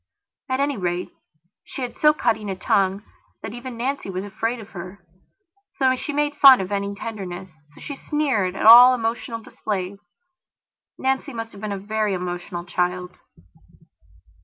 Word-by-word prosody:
At 260 0 0
any 280 -1 0
rate, 180 -1 -2 0.5
she 265 - -7
had 245 - -5
so 300 - +5
cutting 220 -8 -1
a 190 - -2
tongue 195 +2 +1 0.4
that 220 - -6
even 245 0 -8
Nancy 260 -2 -3
was 185 0 -4
afraid 225 +4 -3
of 220 -1 -11
hershe 180 +1 -9 0.8
so 260 -2 +3 0.2
made 295 0 0
fun 270 -2 +9
of 190 +1 -4
any 200 0 -2
tenderness, 190 -4 -7 0.3
she 280 - -7
so - - -20
sneered 260 -12 0
at - - -3
all 245 +3 +10
emotional 230 -1 -3
displays. 195 -2 -4 1.0
Nancy 265 +1 -1
must 225 -1 -6
have 200 - -13
been 215 -1 -4
a 200 - -2
very 210 0 -1
emotional 175 -1 -5
child. 180 +1 -2
215 Hz, 155 wpm, -23 LUFS, 190-250 Hz, 1.0 s, all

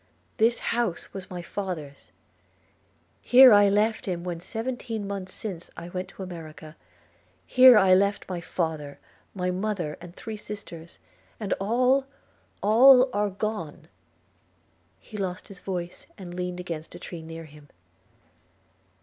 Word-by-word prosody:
This 230 +1 +3 0.2
house 230 -7 -2
was 190 -1 -8
my 180 -1 -6
father's! 170 -7 -6 0.6
– - - -39 0.3
Here 255 -1 +8
I 205 -1 +6
left 210 +2 +1
him 175 -2 -3
when 175 -2 -4
seventeen 225 +1 -4
months 195 -2 -5
since 185 -6 -6
I 170 +1 -7
went 185 +1 -4
to 195 - -9
America 160 -3 -9 0.3
– 90 +2 -37
Here 255 -2 +8
I 190 -2 +5
left 200 +2 +2
my 180 -2 -4
father, 160 -4 -3 0.4
my 180 -1 -1
mother, 185 -5 -3
and 175 0 -11
three 220 -1 -7
sisters 200 -6 -9 0.2
– - - -34
and 210 -3 -1
all, 250 +6 +2 0.6
all 255 +5 +7
are 205 0 +1
gone!' 195 -6 -5 1.1
He 215 - -11
lost 185 -3 -4
his 195 -3 -11
voice, 180 -2 -5
and 180 -3 -9
leaned 180 0 -4
against 165 -2 -6
a - - -9
tree 170 -1 -8
near 165 0 -9
him. 150 -1 -16
185 Hz, 145 wpm, -26 LUFS, 170-215 Hz, 1.1 s, Here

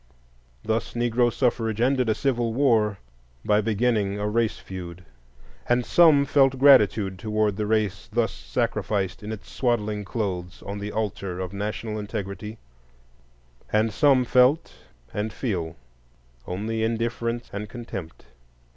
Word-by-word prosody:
Thus 110 0 -1
Negro 120 0 +2
suffrage 115 -3 0
ended 125 -1 +2
a 110 - +2
civil 120 -4 0
war 115 -7 +3 0.5
by 105 0 +3
beginning 105 -2 0
a 105 - -1
race 115 +1 0
feud. 90 -1 -9 0.6
And 120 0 +2
some 150 +1 +5
felt 135 -2 +3
gratitude 105 -8 +5
toward 105 -1 0
the 105 +1 -2
race 105 -4 0
thus 115 +1 +1
sacrificed 90 - -2
in 105 +1 -6
its 110 -2 -8
swaddling 110 -4 -1
clothes 95 -3 -4
on 100 +1 -5
the 105 +1 -5
altar 100 -4 -3
of 90 0 -4
national 105 +2 -4
integrity; 105 +1 -5 1.1
and 110 0 +2
some 135 +1 +4
felt 130 +6 +3 0.4
and 105 +1 -2
feel 90 -10 -3 0.7
only 110 +5 -3
indifference 115 +1 -2
and 105 +1 -5
contempt. 115 - -8
110 Hz, 130 wpm, -25 LUFS, 100-120 Hz, 1.1 s, some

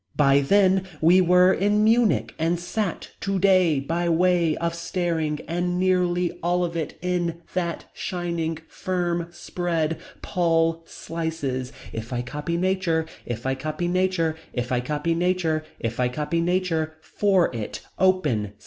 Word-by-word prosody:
By 140 -1 +5
then. 190 +5 +3
We 175 +4 +6
were. 180 +1 +5
In 205 +2 +2
Munich. 215 - +3
And 165 +2 +1
sat. 185 +1 -3
Today. 185 -5 +3
By 170 +5 -1
way 170 -1 +3
Of 170 0 -1
Staring. 170 -3 -2
And 175 +2 -1
nearly 180 -1 +1
all 175 +1 +1
of 170 0 -5
it. 160 -2 -3
In. 175 -2 -1
That. 170 -2 -2
Shining. 170 -3 -3
Firm. 175 -2 -2
Spread. 170 -2 -2 0.2
Paul. 165 -2 +1
Slices. 160 -6 -4 0.2
If 115 +2 -6
I 120 -1 -1
copy 150 +6 -3
nature. 185 -3 +1 0.2
If 120 0 -4
I 130 - +1
copy 155 +5 -3
nature. 180 -3 +1 0.2
If 125 0 -3
I 125 - +2
copy 150 +6 -1
nature. 170 -2 +1 0.2
If 115 +1 -3
I 125 -1 +2
copy 150 +6 -1
nature. 165 -3 0
For 190 -9 +2
it. 110 -2 -5 0.2
Open. 150 - +2
170 Hz, 140 wpm, -24 LUFS, 155-180 Hz, 0.2 s, We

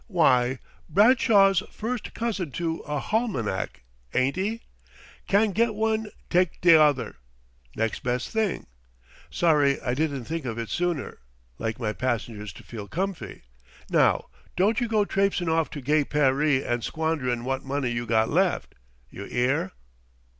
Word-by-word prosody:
"W'y, 130 - +3 0.3
Bradshaw's 200 -1 +5
first 235 +2 -5
cousin 215 -8 -2
to 165 +1 -2
a 150 -1 -1
halmanack, 135 - -2 0.3
ain't 130 +2 +2
'e? 210 +5 -2 0.7
Can't 205 +1 +3
get 225 +1 +1
one, 220 0 0 0.2
take 180 -1 +1
t'other 155 -6 +4 0.6
next 115 0 -1
best 125 0 -2
thing. 220 -4 -1 0.6
Sorry 150 -5 +3
I 125 - -2
didn't 140 -2 -1
think 160 +5 -4
of 115 -2 -4
it 115 -1 -4
sooner; 175 -5 -2 0.4
like 115 0 -3
my 110 -3 -1
passengers 115 -4 -3
to - - -13
feel 105 -4 -8
comfy.... 190 - -4 0.5
Now - - +3 0.3
don't 210 +6 +2
you 240 - 0
go 215 -2 +2
trapsein' 195 -3 0
off 160 -1 +1
to 145 - -7
gay 150 +3 +2
Paree 140 -1 +2
and 120 -1 -2
squanderin' 150 -7 -1
wot 135 +1 -2
money 135 -2 -2
you 120 0 -3
got 110 0 +3
left. 180 +3 +1 0.4
You 100 - -8
'ear?" 125 -5 0
155 Hz, 140 wpm, -26 LUFS, 125-195 Hz, 0.7 s, Bradshaw's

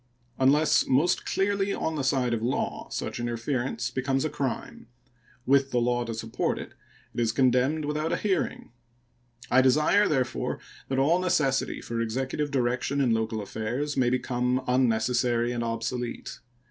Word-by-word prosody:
Unless 145 +4 +4
most 150 +7 +2
clearly 200 0 0
on 160 - -2
the 145 - -2
side 130 -2 +1
of 115 - -1
law, 120 +3 -2
such - - -4
interference 120 - -2
becomes 135 +2 0
a 155 - -2
crime; 130 -3 -4 0.6
with 135 0 +3
the 125 - -1
law 120 0 +1
to 115 -1 -4
support 110 0 -2
it, - - -8 0.4
it 120 - -4
is 115 -2 +2
condemned 130 +4 +2
without 150 +2 -1
a - - +1
heating. 195 - -2 0.8
I 130 - +6
desire, 150 +10 +4
therefore, 130 -4 -1 0.3
that 135 - -2
all 155 +7 +3
necessity 155 -7 +1
for 115 0 -3
Executive 135 +6 -2
direction 130 +1 0
in 125 -4 +3
local 110 -1 -1
affairs 120 +9 -3
may 125 -2 +3
become 125 0 0
unnecessary 120 -1 +2
and 120 -1 -2
obsolete. 115 +1 -4
130 Hz, 150 wpm, -27 LUFS, 120-145 Hz, 0.8 s, I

